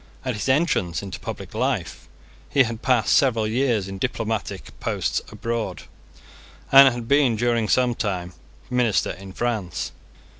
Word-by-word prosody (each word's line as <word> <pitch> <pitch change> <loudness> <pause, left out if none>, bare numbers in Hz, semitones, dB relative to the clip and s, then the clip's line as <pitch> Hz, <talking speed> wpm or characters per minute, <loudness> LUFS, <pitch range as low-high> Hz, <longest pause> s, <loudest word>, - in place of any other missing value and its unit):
At 130 - -1
his 105 +4 -3
entrance 130 - +1
into 95 - -6
public - - -7
life, - - -2 0.4
he 135 - +4
had 115 -1 -5
passed 125 -4 +2
several 120 -7 +3
years 115 -3 0
in 95 0 -7
diplomatic 110 -3 -3
posts - - -1
abroad, 115 -7 -3 0.9
and 135 0 +9
had 120 -1 -6
been, 140 -4 +3
during 115 -1 0
some 125 -1 +3
time, 90 -6 -3 0.4
minister 125 -4 +2
in 95 +1 -10
France. 105 -5 -3
115 Hz, 140 wpm, -23 LUFS, 100-125 Hz, 0.9 s, and